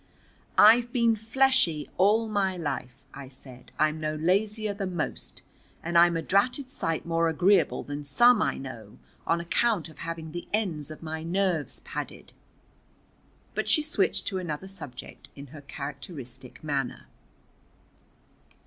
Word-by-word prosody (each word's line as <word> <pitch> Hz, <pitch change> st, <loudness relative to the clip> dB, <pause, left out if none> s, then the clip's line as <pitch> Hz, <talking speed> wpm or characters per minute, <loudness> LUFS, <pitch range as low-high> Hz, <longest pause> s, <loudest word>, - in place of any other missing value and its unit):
"I've 235 Hz, +3 st, +7 dB
been 235 Hz, -2 st, +3 dB
fleshy 225 Hz, -, +2 dB
all 215 Hz, +4 st, +3 dB
my 195 Hz, -3 st, 0 dB
life," 135 Hz, -6 st, -4 dB, 0.2 s
I 140 Hz, -1 st, -9 dB
said. 130 Hz, -1 st, -13 dB
"I'm 155 Hz, +1 st, +2 dB
no 155 Hz, 0 st, -2 dB
lazier 205 Hz, +6 st, +1 dB
than 195 Hz, -3 st, -4 dB
most, 155 Hz, -, -4 dB, 0.4 s
and 170 Hz, +1 st, -4 dB
I'm 170 Hz, 0 st, +6 dB
a 165 Hz, -, -3 dB
dratted 250 Hz, +7 st, +2 dB
sight 165 Hz, -, -2 dB
more 165 Hz, 0 st, +1 dB
agreeable 175 Hz, +3 st, +3 dB
than 145 Hz, 0 st, -6 dB
some 225 Hz, -, +5 dB
I -, -, 0 dB
know, 115 Hz, -6 st, -9 dB, 0.3 s
on 170 Hz, -, +2 dB
account 175 Hz, +1 st, 0 dB
of 155 Hz, -, -16 dB
having 165 Hz, -1 st, -5 dB
the 175 Hz, +2 st, -6 dB
ends 175 Hz, -9 st, -1 dB
of 155 Hz, +1 st, -10 dB
my 160 Hz, 0 st, -4 dB
nerves 175 Hz, -2 st, -1 dB
padded." -, -, -7 dB, 1.2 s
But -, -, -2 dB
she 305 Hz, -, +5 dB
switched 310 Hz, +4 st, 0 dB
to 190 Hz, -3 st, -3 dB
another 175 Hz, 0 st, -5 dB
subject 160 Hz, -10 st, -9 dB
in 140 Hz, -, -9 dB
her 150 Hz, -, -9 dB
characteristic 140 Hz, -3 st, -8 dB
manner. 140 Hz, -4 st, -2 dB
170 Hz, 140 wpm, -27 LUFS, 150-205 Hz, 1.2 s, I've